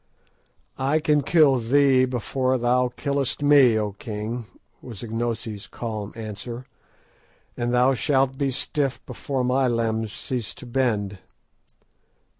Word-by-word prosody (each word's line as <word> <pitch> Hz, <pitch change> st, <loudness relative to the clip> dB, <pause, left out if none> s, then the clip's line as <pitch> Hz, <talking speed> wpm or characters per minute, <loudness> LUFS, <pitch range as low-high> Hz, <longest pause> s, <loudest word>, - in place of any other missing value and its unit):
"I 140 Hz, +4 st, +2 dB
can 150 Hz, -1 st, +2 dB
kill 145 Hz, -2 st, +4 dB
thee 130 Hz, +2 st, +4 dB
before 130 Hz, +1 st, -1 dB
thou 125 Hz, +1 st, +2 dB
killest 140 Hz, +2 st, -2 dB
me, 140 Hz, -6 st, +6 dB
O 105 Hz, -1 st, -1 dB
king," 110 Hz, +3 st, -5 dB, 0.3 s
was 115 Hz, -5 st, -8 dB
Ignosi's 115 Hz, -2 st, -3 dB
calm 110 Hz, -3 st, -5 dB
answer, 115 Hz, +3 st, -6 dB, 0.9 s
"and 120 Hz, 0 st, -2 dB
thou 125 Hz, +2 st, +4 dB
shalt 135 Hz, 0 st, +1 dB
be 140 Hz, 0 st, 0 dB
stiff 135 Hz, -1 st, -1 dB
before 135 Hz, -3 st, -3 dB
my 130 Hz, +1 st, +2 dB
limbs 115 Hz, -2 st, -1 dB
cease 120 Hz, -2 st, -3 dB
to -, -, -10 dB
bend." 110 Hz, -6 st, -1 dB
125 Hz, 120 wpm, -24 LUFS, 115-135 Hz, 0.9 s, me